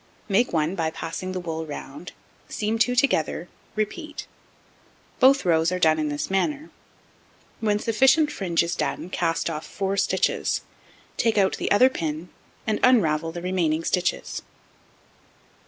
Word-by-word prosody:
Make 210 +5 +2
1 160 +1 +1
by 165 -4 -1
passing 165 +3 -5
the 185 - -3
wool 165 -2 -4
round, 145 +1 -8 0.4
seam 220 +1 -1
2 245 +2 +3
together, 180 - +1 0.3
repeat; 295 +9 -4 0.9
both 270 -2 +5
rows 165 -1 +3
are 180 - 0
done 160 -3 +3
in 155 -1 0
this 145 0 -3
manner: 290 - -1 0.9
when 210 -2 +1
sufficient 265 +8 +3
fringe 170 -4 0
is 170 +1 -2
done, 180 - -3
cast 165 -1 0
off 155 -2 -3
4 195 0 -3
stitches, 200 - +1 0.6
take 225 -2 +1
out 195 -2 +3
the - - -2
other 230 +6 +6
pin, 160 -5 -4 0.4
and 215 -2 0
unravel 165 -10 +3
the 175 +1 -7
remaining 170 -4 0
stitches. 180 +1 -1
185 Hz, 140 wpm, -24 LUFS, 165-220 Hz, 0.9 s, other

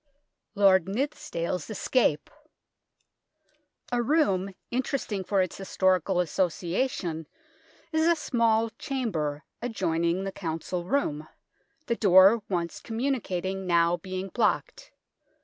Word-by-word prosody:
LORD 190 -3 +5
NITHSD 260 +9 -3
ALE'S 180 +2 -3
ESCAPE 215 - +1 1.6
A 245 0 +1
room 200 - +1 0.2
interesting 245 -5 -2
for 195 0 +2
its 185 - -6
historical 190 -1 +1
associa 180 - 0
tion 160 - -5 0.6
is 315 0 +2
a 340 - +5
small 230 -6 +1
chamber 175 - -2 0.2
adjoining 180 -6 0
the 195 - -3
Council 170 0 -4
Room, 155 - -1 0.6
the 235 - 0
door 195 +2 +6
once 170 -3 -2
communicating 195 -7 -2
now 170 0 +3
being 185 +2 -5
blocked. - - -1
190 Hz, 105 wpm, -27 LUFS, 175-235 Hz, 1.6 s, door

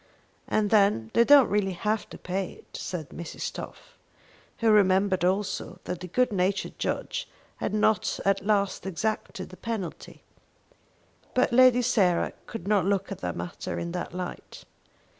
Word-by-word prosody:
"And 210 -1 +1
then 200 - +3
they 235 - +6
don't 280 0 +7
really 200 -2 +1
have 210 +4 -2
to - - -9
pay 185 +1 -3
it," - - -16
said 160 -6 -5
Mrs. 170 -1 -6
Toff, - - -10 0.6
who 230 -1 +3
remembered 190 -2 +4
also 185 -1 -1
that 180 -1 -4
the 180 - -7
good 250 +7 +1
natured 190 +1 -1
judge - - -3 0.3
had - - -2
not 215 -1 +1
at 195 0 +2
last 200 -2 0
exacted 190 +1 -3
the 185 - -12
penalty. 220 -7 -6 1.1
But 255 -1 +2
Lady 250 0 +6
Sarah 195 -8 +2
could 200 -5 -7
not 200 -4 +3
look 195 0 0
at 195 - -5
the - - -2
matter 175 - -5
in 170 0 -3
that 175 0 -4
light. 180 0 -7
195 Hz, 155 wpm, -27 LUFS, 180-215 Hz, 1.1 s, don't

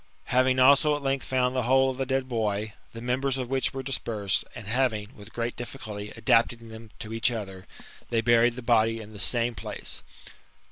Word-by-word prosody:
Having 130 +1 +4
also 140 +3 +6
at 145 - -6
length 135 0 0
found 130 0 +1
the 130 - +2
whole 130 +2 +4
of 130 - -9
the 135 - -1
dead 135 0 0
boy, 110 -3 -1 0.2
the 115 0 -9
members 130 +2 0
of 130 -1 -4
which 135 -1 +1
were 135 0 -5
dispersed, 110 -7 -1
jind 110 - -8
having, 110 -1 0
with 105 -1 -13
great 120 0 -3
difficulty, 105 -4 -7
adapted 115 +1 +3
them 115 -1 -11
to 110 0 -7
each 115 +2 +2
other, 95 -5 -6 0.4
they 115 - +1
buried 120 +1 +4
the 125 - -7
body 115 -1 +3
in 110 0 -10
the 105 - -9
same 120 +2 0
place. 95 - -5
120 Hz, 195 wpm, -27 LUFS, 110-130 Hz, 0.4 s, also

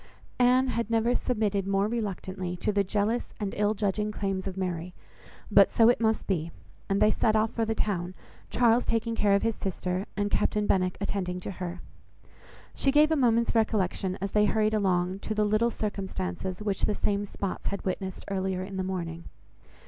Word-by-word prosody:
Anne 250 +1 +5
had 235 -3 -2
never 230 +1 +2
submitted 210 -6 0
more 195 +1 +2
reluctantly 190 -5 -3
to 210 - 0
the 200 -1 +2
jealous 210 +4 -1
and 205 -2 -3
ill 210 +1 +1
judging 210 +1 -1
claims 195 -2 -3
of 190 -1 -5
Mary; 180 -1 -3 0.6
but - - +6
so 230 -1 +5
it 245 - +2
must 220 -1 +1
be, 170 -4 -1 0.4
and 195 0 +2
they 215 - +5
set 220 0 +2
off 215 0 +2
for 230 - -1
the 225 0 -1
town, 185 -4 -2 0.3
Charles 240 0 +3
taking 230 0 -1
care 205 -3 +3
of 200 - +1
his 230 0 +1
sister, 185 0 -3
and 205 0 0
Captain 210 0 +1
Benwick 185 -2 +1
attending 190 -3 -2
to - - -5
her. 180 -1 -6 0.9
She 275 - +1
gave 300 +2 +5
a - - +4
moment's 235 -4 +2
recollection, 200 -4 0
as 195 0 -3
they 210 0 +4
hurried 215 0 +2
along, 185 -2 +1
to 215 - -4
the 210 0 +2
little 215 +3 +2
circumstances 190 - -4
which 200 -2 0
the 210 - -1
same 200 0 0
spots 200 -1 -5
had 200 - -3
witnessed 190 0 -4
earlier 190 -1 -2
in 190 0 -7
the 190 - -1
morning. 170 -3 -4
200 Hz, 185 wpm, -28 LUFS, 190-220 Hz, 0.9 s, but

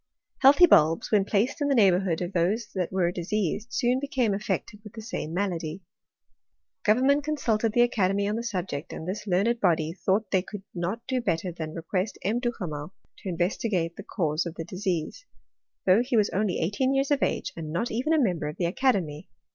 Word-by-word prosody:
Healthy 285 +6 +8
bulbs, 160 - +4
when 205 -3 +4
placed 225 +10 0
in 290 - +2
the 280 - +2
neighbourhood 185 -5 +3
of 175 +2 -5
those 200 +6 0
that 180 -3 -2
were 180 -2 +1
diseased, 205 +4 -2
soon 250 0 +1
became 260 -6 0
affected 210 +1 -3
with 210 - -11
the 225 - -8
same 205 -7 -4
malady. 175 -2 -3 1.0
Government 265 +7 +3
consulted 230 -8 0
the 240 - +5
aca 220 -6 +2
demy 200 +1 0
on 210 - -1
the 230 - -2
subject; 185 -9 -4
and 160 - -7
this 205 +3 -4
learned 205 +6 +2
body 165 -5 +1
thought 195 +3 0
they 190 - +3
could 200 +1 -9
not 190 +7 -3
do 260 -1 -1
better 180 -4 -1
than 160 -2 -6
request 185 +4 -2
M. 220 +5 0
Duhamel 180 - -4 0.2
to 195 - -6
investigate 175 0 -1
the - - -8
cause 165 -5 -1
of 170 - -7
the 165 - -5
disease; 185 - -3 0.6
though 190 +4 +5
he 245 -1 0
was 210 -1 +2
only 200 -1 0
eighteen 255 +11 0
years 275 +1 +1
of 285 - +2
age, - - -1
and 155 -2 -6
not 180 +9 -1
even 255 +8 -1
a 320 - +4
member 180 - 0
of 150 - -6
the 175 - 0
academy. 175 - 0
195 Hz, 195 wpm, -26 LUFS, 175-235 Hz, 1.0 s, Healthy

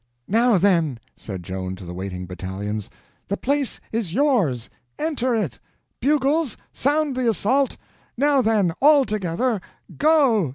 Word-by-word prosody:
"Now, 230 +1 +4
then," 170 -8 +2 0.2
said 95 -4 -7
Joan 95 +1 -4
to 95 0 -11
the 90 - -7
waiting 90 0 -5
battalions, 95 +3 -5 0.4
"the 200 - -2
place 280 -1 0
is 215 -6 -2
yours—enter 245 - 0
in! 205 - 0 0.5
Bugles, 285 0 +1
sound 290 0 +1
the 255 -2 +1
assault! 255 +5 +1 0.4
Now, 280 +1 +3
then—all 225 - +4
together—go!" 220 - +1
215 Hz, 115 wpm, -23 LUFS, -, 0.5 s, Now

